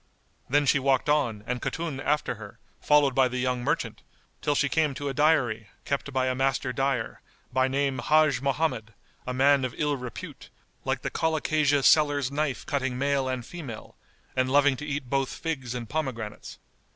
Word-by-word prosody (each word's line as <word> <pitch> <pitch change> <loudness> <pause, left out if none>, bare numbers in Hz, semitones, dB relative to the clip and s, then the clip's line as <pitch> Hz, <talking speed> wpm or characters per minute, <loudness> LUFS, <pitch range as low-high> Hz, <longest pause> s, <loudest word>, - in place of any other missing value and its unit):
Then 145 +2 +3
she 140 +1 +4
walked 135 +2 +1
on 120 -8 +1
and 125 0 -3
Khatun 160 -5 -3
after 145 +2 0
her, - - -11 0.2
followed 145 -2 +4
by 130 0 +4
the 125 0 -4
young 125 -1 -1
merchant, - - -1 0.4
till 145 - +1
she 140 - +2
came 150 -2 +1
to 145 +1 -3
a - - -3
dyery, 130 -7 +2 0.2
kept 140 0 -2
by 130 -1 +1
a 130 - +1
master 130 -1 0
dyer, 135 -2 -1 0.3
by 130 +1 +3
name 135 0 0
Hajj 155 -5 +3
Mohammed, 135 -6 -1 0.3
a 125 - -2
man 140 +1 +4
of 125 -2 -3
ill 150 -1 +1
repute; 125 -2 -8 0.4
like - - -1
the - - -2
colocasia[FN#194] 155 -3 +1
seller's 145 -3 +4
knife 145 -2 -2
cutting 130 -3 -1
male 140 0 +1
and 130 -2 -3
female, 135 -11 -8 0.4
and 130 0 +1
loving 145 0 +4
to 150 - -6
eat 145 -3 -3
both 135 0 0
figs 135 -7 -4
and 120 -2 -5
pomegranates. 115 -7 -4
135 Hz, 175 wpm, -27 LUFS, 125-145 Hz, 0.4 s, she